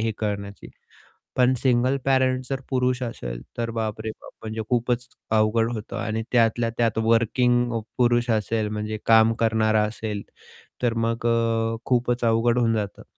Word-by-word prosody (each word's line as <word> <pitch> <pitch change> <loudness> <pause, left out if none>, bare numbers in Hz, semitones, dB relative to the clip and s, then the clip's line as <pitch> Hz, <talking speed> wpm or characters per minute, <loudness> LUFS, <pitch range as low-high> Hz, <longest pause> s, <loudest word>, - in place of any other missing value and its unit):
हे 110 0 0
करण्याची. 100 -1 -4 0.7
पण 125 0 +4
सिंगल 130 +1 +2
पॅरेंट 130 -1 +2
जर 135 -1 -2
पुरुष 125 -1 0
असेल, - - -5 0.2
तर 115 -1 -2
बापरे 110 -1 -3
बाप! - - -11
म्हणजे 110 0 -4
खूपच 120 0 0 0.2
अवघड 110 +1 +2
होतं. 110 -1 -6
आणि 110 +1 -2
त्यातल्या 115 -1 +2
त्यात 115 -2 +1
वर्किंग 120 +2 +2
अ, - - -1 0.2
पुरुष 120 -1 +2
असेल, 110 0 0
म्हणजे 105 0 -3
काम 115 0 +5
करणारा 110 -1 +3
असेल, 105 -2 -5 0.6
तर 120 -2 +1
मग 115 0 -2
अ, 115 -1 +1
खूपच 120 -1 +1
अवघड 115 +1 +2
होऊन 115 -2 +2
जातं. 105 -2 -4
115 Hz, 150 wpm, -24 LUFS, 110-120 Hz, 0.7 s, काम